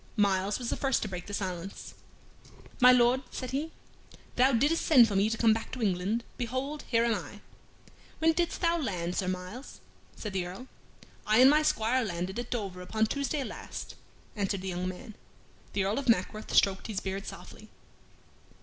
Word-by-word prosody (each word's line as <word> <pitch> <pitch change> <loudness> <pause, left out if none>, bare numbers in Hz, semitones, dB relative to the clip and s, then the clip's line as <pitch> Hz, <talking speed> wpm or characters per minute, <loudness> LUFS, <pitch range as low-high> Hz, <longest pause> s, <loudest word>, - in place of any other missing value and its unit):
Myles 200 -1 +2
was 245 -2 -4
the - - 0
first 270 -2 +1
to - - -3
break 180 -3 -6
the 205 - -7
silence. 185 -1 -5 0.9
"My 250 0 +8
Lord," 250 +1 +4
said 255 -1 -6
he, 295 +5 -2 0.6
"thou 260 +2 +5
didst 290 +7 +2
send 255 -7 +7
for 205 - -3
me 200 +2 +3
to 225 - -2
come 225 -1 +5
back 225 - -5
to 255 - -5
England; 200 +4 0
behold, 260 +4 -3
here 230 -1 +2
am 235 - +2
I." - - -6 0.8
"When 325 0 +3
didst 345 +1 -1
thou 340 -1 +2
land, 180 - -2
Sir 190 - -1
Myles?" 185 +8 -6 0.4
said 210 -3 -6
the 185 -2 -1
Earl. 190 +8 -8 0.6
"I 215 +1 +4
and 260 +2 +8
my 305 +1 +4
squire 255 -3 +1
landed 185 +1 -3
at 240 - -5
Dover 195 -6 -4
upon 220 +4 0
Tuesday 280 +4 -2
last," - - -7 0.4
answered 200 -2 -1
the 190 - -4
young 180 0 -3
man. 215 +5 -7 0.6
The 200 - +1
Earl 200 +6 0
of 275 - -3
Mackworth 215 +1 +1
stroked 195 -1 +3
his 210 -4 -3
beard 195 +1 -5
softly. - - -10
220 Hz, 185 wpm, -29 LUFS, 190-255 Hz, 0.9 s, My